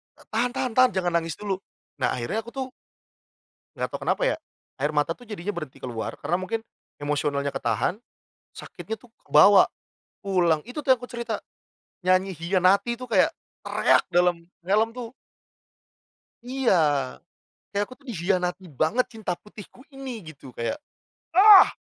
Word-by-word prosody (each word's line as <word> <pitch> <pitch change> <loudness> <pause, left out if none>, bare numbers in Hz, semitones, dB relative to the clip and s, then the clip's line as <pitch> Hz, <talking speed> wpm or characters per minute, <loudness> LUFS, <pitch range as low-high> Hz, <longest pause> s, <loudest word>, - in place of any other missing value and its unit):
Ta - - -19
tahan 240 +3 0
tahan 255 -2 -1
tahan. 255 -1 +7
Jangan 175 -2 0
nangis 165 -2 -5
dulu." 200 -3 -2 0.4
Nah, - - +2
akhirnya 125 - -2
aku - - -8
tuh 260 -1 -4 1.1
nggak - - -2
tahu - - -4
kenapa - - +1
ya, - - +2 0.4
air 145 +2 +1
mata 150 +2 +2
tuh 245 +7 -16
jadinya 205 -1 -4
berhenti 155 -7 -7
keluar, 115 -3 -4
karena 175 - 0
mungkin, 225 +4 -2 0.4
emosionalnya 145 -1 0
ketahan, 135 - -1 0.5
sakitnya 220 0 -7
tuh 245 - -19 0.2
kebawa, - - +7 0.5
pulang 175 -6 +2
itu 250 +5 -7
tuh 260 - +7
yang 245 - -4
aku 245 - -8
cerita. 235 -3 -4 0.6
Nyanyi 185 0 +2
Khianati 185 +6 +2
itu 255 - -5
kayak, 195 -5 +4 0.3
teriak - - +3
dalam 175 -1 +3 0.2
helm 215 +4 +3
tuh 245 -1 -7 1.3
Iya. 255 -5 +2 1.0
Kayak 200 +1 +1
aku 255 - -9
tuh 280 - -23
dikhianati 180 -1 -1 0.2
banget, 230 +11 +3
cinta 210 -5 -2
putihku 210 +6 -13
ini 270 -2 -7 0.2
gitu, 140 -4 -13
kayak 115 - -2 0.6
Ah! 390 +1 +9
195 Hz, 150 wpm, -25 LUFS, 170-240 Hz, 1.3 s, Ah